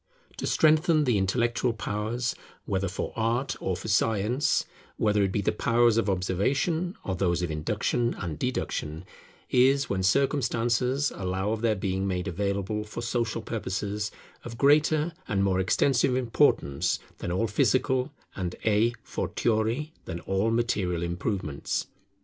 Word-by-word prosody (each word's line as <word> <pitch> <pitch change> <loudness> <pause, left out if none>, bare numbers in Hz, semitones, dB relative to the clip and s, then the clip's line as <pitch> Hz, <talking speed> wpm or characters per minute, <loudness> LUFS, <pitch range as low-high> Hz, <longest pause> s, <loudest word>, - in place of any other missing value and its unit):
To - - -3
strengthen 155 0 +4
the 120 -7 +2
intellectual 120 +5 +1
powers, 115 +3 -2 0.3
whether 95 0 -1
for 95 - -4
art 120 +4 0
or 95 -2 -2
for 95 - -7
science, 110 +4 +2 0.3
whether 105 -1 +2
it 95 -1 +1
be 105 - 0
the - - +1
powers 120 -1 +3
of 115 -3 +1
observation 140 - 0
or 95 - -2
those 90 -1 0
of 85 - -2
induction 105 +9 0
and 85 -5 -5
deduction, 85 -9 -3 0.5
is, 135 +2 +4
when 95 -1 0
circumstances 125 +3 +1
allow 95 +2 -2
of 110 -1 -2
their 115 -2 +2
being 95 0 -1
made 90 0 -2
available 100 +3 -1
for 105 +2 -7
social 115 -1 -1
purposes, 105 0 -3 0.3
of 115 -1 -8
greater 150 +4 +3
and 100 -2 +1
more 95 -1 +2
extensive 125 +7 +2
importance, 90 - +2 0.2
than - - -3
all 95 +6 +1
physical, 130 +5 +1 0.2
and, 90 -2 -3
a 110 +2 +3
fortiori 115 +7 -1
than 85 - -5
all 95 +6 0
material 100 -7 0
improvements. 85 -3 -2
110 Hz, 140 wpm, -27 LUFS, 95-125 Hz, 0.5 s, strengthen